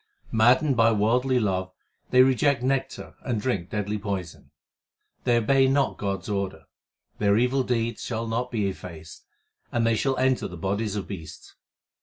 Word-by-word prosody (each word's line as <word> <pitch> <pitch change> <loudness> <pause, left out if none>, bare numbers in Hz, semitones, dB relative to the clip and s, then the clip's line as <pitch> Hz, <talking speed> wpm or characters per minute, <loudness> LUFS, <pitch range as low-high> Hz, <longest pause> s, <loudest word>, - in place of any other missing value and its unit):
Maddened 125 +5 +4
by 115 0 +4
worldly 125 +5 +2
love 95 -4 -1 0.4
they 125 0 +6
reject 130 0 +2
nectar 135 +1 -2
and 120 -4 -2
drink 100 -7 -2
deadly 105 0 -2
poison. 95 -8 -5 0.8
They 120 -1 +4
obey 135 +4 +3
not 135 +1 +1
God 100 -2 -2
s 90 - -10
order; 100 -5 -3 0.6
their 100 0 +3
evil 125 +3 +2
deeds 120 -2 -1
shall 115 -1 -3
not 115 +2 -2
be 110 -5 -1
effaced, 85 -4 -9 0.4
and 115 -1 +1
they 115 0 +3
shall 135 +4 0
enter 130 0 +1
the 90 - -9
bodies 100 +4 -2
of 100 - -4
beasts. 80 -6 -9
115 Hz, 160 wpm, -25 LUFS, 100-125 Hz, 0.8 s, they